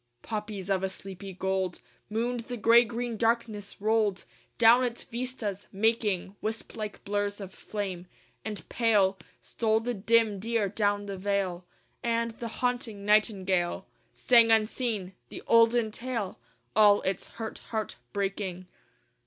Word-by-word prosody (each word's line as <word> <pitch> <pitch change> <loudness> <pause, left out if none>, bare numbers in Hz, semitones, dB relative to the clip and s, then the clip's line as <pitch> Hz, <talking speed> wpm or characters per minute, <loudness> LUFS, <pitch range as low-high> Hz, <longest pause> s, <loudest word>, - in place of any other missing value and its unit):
III 120 0 -49
Poppies 210 -3 -4
of 190 -1 +2
a 190 - -1
sleepy 195 0 -8
gold 190 -1 -2 0.3
Mooned 235 +3 -1
the 245 -1 -4
gray 230 +2 +6
green 235 0 -4
darkness 225 -2 -1
rolled 215 -2 +1 0.3
Down 235 +2 +7
its 240 -1 -2
vistas, 235 -5 -5
making 205 -2 0
Wisp 220 +1 -4
like 215 -2 -6
blurs 205 0 -1
of 195 -2 -8
flame. 190 -4 -5 0.4
And 210 -2 -5
pale 205 -5 +2 0.2
Stole 220 -1 +1
the 245 +2 -2
dim 220 -1 +2
deer 225 -1 0
down 205 0 0
the 200 -1 -5
vale: 190 -2 -1 0.4
And 230 0 0
the 230 +1 -6
haunting 230 -4 -2
nightingale 195 -4 +2 0.3
Sang 235 -2 +5
unseen 220 -3 +1 0.2
the - - -8
olden 230 -1 +4
tale 230 -4 -4 0.4
All 205 -1 +6
its 190 0 -2
hurt 225 -1 -5
heart 220 - -3
breaking. 195 -2 -3
210 Hz, 135 wpm, -28 LUFS, 195-230 Hz, 0.4 s, Down